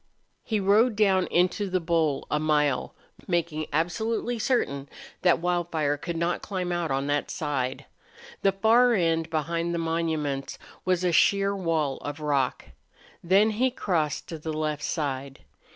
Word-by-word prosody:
He 215 -2 -1
rode 210 +4 +4
down 195 -3 +3
into 185 +3 +1
the 185 0 +1
bowl 165 -4 0
a 150 - +2
mile, 150 -4 +1 0.3
making 170 -4 -1
absolutely 220 +9 -1
certain 140 - 0 0.3
that 180 -2 +4
Wildfire 170 -4 0
could 170 +3 -5
not 170 +1 -1
climb 185 -3 -3
out 175 -2 -1
on 135 +1 0
that 145 0 -1
side. 135 -5 -3 0.6
The 195 - +4
far 230 +5 +4
end, 165 -3 +1
beyond 170 +2 -1
the - - -1
monuments, 160 -4 -2 0.3
was 185 -1 +1
a 180 - +2
sheer 200 +3 +3
wall 160 -7 0
of 145 +1 -6
rock. 145 -4 0 0.6
Then 195 +5 +4
he 245 +5 +1
crossed 170 - -1
to 165 - -6
the 160 +1 -4
left 155 -1 -2
side. 140 -3 -3
170 Hz, 150 wpm, -26 LUFS, 150-190 Hz, 0.6 s, rode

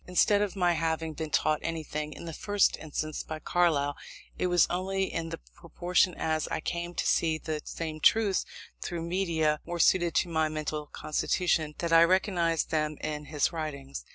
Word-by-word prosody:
Instead 200 +3 +3
of 205 -2 -1
my 180 -2 +3
having 160 -1 -1
been 160 0 -5
taught 155 +1 +2
anything, 155 -2 -4
in 160 - -9
the 165 - -6
first 205 +4 +2
instance, 155 0 -4
by 155 - -6
Carlyle, 155 -4 +1 0.4
it - - 0
was 175 -1 +5
only 190 +2 -1
in 165 -1 -3 0.2
proportion 180 - 0
as 155 -1 -1
I - - -2
came 175 +2 -4
to - - -1
see 160 -1 +2
the 155 -1 -4
same 160 -2 -5
truths 205 +3 +4 0.4
through 170 -1 -4
media 165 -4 0
more 175 0 -5
suited 175 -2 +3
to 175 - +3
my 160 -2 +1
mental 155 -1 -4
constitution, 155 0 0
that 170 -1 -1
I 165 0 +8
recognised 175 -2 +2
them 155 -1 0
in 150 -1 -4
his 150 -1 0
writings. 140 -4 -5
165 Hz, 175 wpm, -29 LUFS, 155-175 Hz, 0.4 s, I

